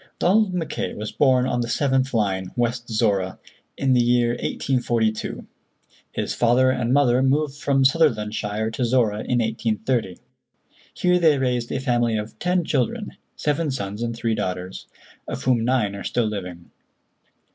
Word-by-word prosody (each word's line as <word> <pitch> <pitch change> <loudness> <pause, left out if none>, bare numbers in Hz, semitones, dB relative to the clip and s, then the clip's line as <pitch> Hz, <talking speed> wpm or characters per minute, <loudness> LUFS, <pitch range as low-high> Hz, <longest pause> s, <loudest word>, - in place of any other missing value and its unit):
Donald 205 +2 +3
Mackay 175 -3 -3
was 105 +1 -5
born 130 -3 +3
on 125 -1 0
the 120 - -2
seventh 135 0 +1
line, 95 -4 0
West 120 0 -1
Zorra, 100 -4 0 0.4
in 135 -1 +2
the 125 - +4
year 120 0 +3
1842. 120 -2 -1 0.7
His - - -3
father 125 +2 +3
and 125 -2 -1
mother 130 -2 +4
moved 140 +2 +1
from 135 -2 +1
Sutherlandshire 110 -7 +1
to 125 - -2
Zorra 115 -4 +2
in 125 +3 -1
1830. 110 -2 -1 0.8
Here 180 0 +2
they 160 -4 +4
raised 125 -3 -1
a - - -1
family 120 -4 +1
of 105 +1 -6
ten 180 -1 +1
children—seven 150 +3 -2
sons 105 -5 -4
and 115 -1 -2
three 115 -1 -1
daughters—of 90 -2 -6
whom 125 -3 +2
nine 115 -5 +1
are 100 - -7
still 120 - 0
living. 90 -5 -6
120 Hz, 145 wpm, -23 LUFS, 110-135 Hz, 0.8 s, the